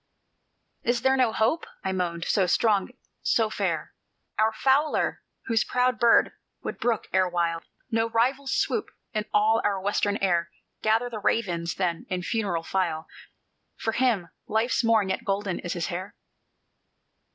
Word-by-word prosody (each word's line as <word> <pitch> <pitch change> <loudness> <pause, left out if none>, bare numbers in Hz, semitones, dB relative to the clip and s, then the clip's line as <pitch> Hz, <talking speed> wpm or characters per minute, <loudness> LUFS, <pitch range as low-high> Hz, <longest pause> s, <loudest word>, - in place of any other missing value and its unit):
"Is 240 0 0
there 265 0 +4
no 255 -4 +3
hope?" 225 +10 +1 0.2
I 190 - -1
moaned, 175 -3 -2
"so 190 -3 +2
strong, 205 0 +2 0.3
so 220 -2 +2
fair! - - -2 0.5
Our 220 +1 +4
Fowler 275 +6 +1 0.2
whose 225 -1 +2
proud 250 -2 +1
bird 235 -1 +5 0.3
would - - -5
brook 235 -3 0
erewhile 175 -3 +1 0.3
No 225 0 +1
rival's 260 +4 +1
swoop 430 - 0 0.2
in 215 -1 -1
all 220 +2 +3
our 200 -2 +1
western 205 +1 0
air! 175 -3 +1 0.3
Gather 225 +3 +2
the 220 - -4
ravens, 175 -5 0
then, 175 -3 -2
in 180 -2 -2
funeral 195 -6 -1
file 165 -4 -1 0.7
For 225 - -2
him, 220 -8 +1 0.2
life's 225 +3 +1
morn 220 -4 +3
yet 190 - -2
golden 200 -3 -1
in 175 - -6
his 170 -1 -1
hair? 185 +2 -5
215 Hz, 145 wpm, -26 LUFS, 185-230 Hz, 0.7 s, bird